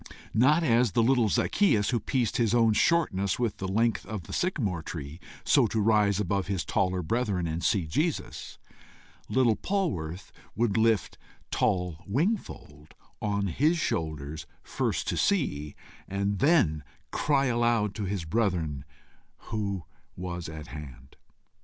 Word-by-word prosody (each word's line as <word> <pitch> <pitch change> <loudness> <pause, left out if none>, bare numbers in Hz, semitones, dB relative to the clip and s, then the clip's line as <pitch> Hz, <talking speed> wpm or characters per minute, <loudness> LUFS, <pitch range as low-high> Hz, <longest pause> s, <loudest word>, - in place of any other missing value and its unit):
Not 150 +9 +4
as 120 - +3
the 115 - +3
little 120 -2 +3
Zacchæus 110 - +2
who 120 - +1
pieced 120 +1 -1
his 120 -2 +2
own 115 -2 +4
shortness 100 - +2
with 120 -4 -1
the 95 - -4
length 110 +2 +1
of 105 -5 -5
the - - -9
sycamore 110 - -1
tree, 75 0 -7 0.3
so - - +4
to 110 - -1
rise 105 -2 +3
above 100 -1 -1
his 95 -3 -2
taller 90 -1 0
brethren 100 -1 0
and 80 +1 -3
see 95 -5 +2
Jesus, 150 - -2 0.7
little 120 -4 +3
Polwarth 95 - -2 0.2
would 115 -3 +1
lift 110 -1 +1 0.3
tall 90 -6 0
Wingfold 110 - -3 0.3
on 100 -1 0
his 150 - +2
shoulders, 80 - -3 0.2
first - - -2
to - - -1
see, 75 - 0 0.3
and 100 0 -1
then 120 - +3 0.3
cry 140 -2 +2
aloud 120 -4 +1
to 105 -1 -4
his 95 -3 -3
brethren 80 - -1 0.7
who 100 -5 -2 0.3
was 90 -2 -5
at 80 -1 -8
hand. 70 -4 -10
100 Hz, 140 wpm, -28 LUFS, 85-120 Hz, 0.7 s, Not